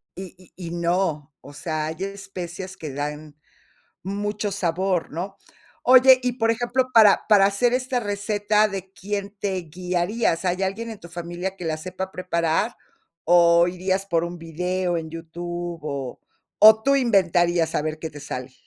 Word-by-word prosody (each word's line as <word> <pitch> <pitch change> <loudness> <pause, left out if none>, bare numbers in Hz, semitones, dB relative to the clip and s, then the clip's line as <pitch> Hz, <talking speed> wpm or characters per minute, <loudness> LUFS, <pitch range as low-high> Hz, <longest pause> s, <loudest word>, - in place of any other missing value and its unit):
y 190 0 -8
y 185 - -20 0.2
y - - -6
no, 170 -4 -1
o 145 - -13
sea, 155 +1 -3
hay 160 0 -5
especias 190 -2 -7
que 155 -6 -7
dan 150 +1 -5 0.7
mucho 205 +2 -3
sabor, 185 -1 -1
¿no? 190 +5 -5 0.5
Oye, 255 +1 +7
y 250 -1 0
por 225 -2 +1
ejemplo, 240 +2 0
para 215 -3 +6
para 205 -3 +6
hacer 240 +5 +1
esta 255 -1 -1
receta, 205 0 +1
¿de 190 -1 -7
quién 200 +1 -4
te 195 -1 -2 0.2
guiarías?, 180 +2 -1
¿hay 180 +2 0
alguien 195 +5 -2
en 220 - -8
tu 170 - -11
familia 175 +2 -5
que 180 - -8
la 160 -1 -1
sepa 185 +3 -6
preparar?, 170 +3 0 0.6
o, 170 0 +6
¿irías 185 +2 -2
por 170 -2 +1
un 175 0 -6
video 180 +2 -2
en 160 -1 -5
YouTube, 170 +1 -6
o 140 -4 -5 0.4
o 220 +1 +8
tú 275 +2 +3
inventarías 175 -8 +2
a - - +1
ver 155 0 -3
qué 160 - -5
te 145 0 -11
sale? 130 -2 -6
185 Hz, 165 wpm, -23 LUFS, 170-205 Hz, 0.7 s, o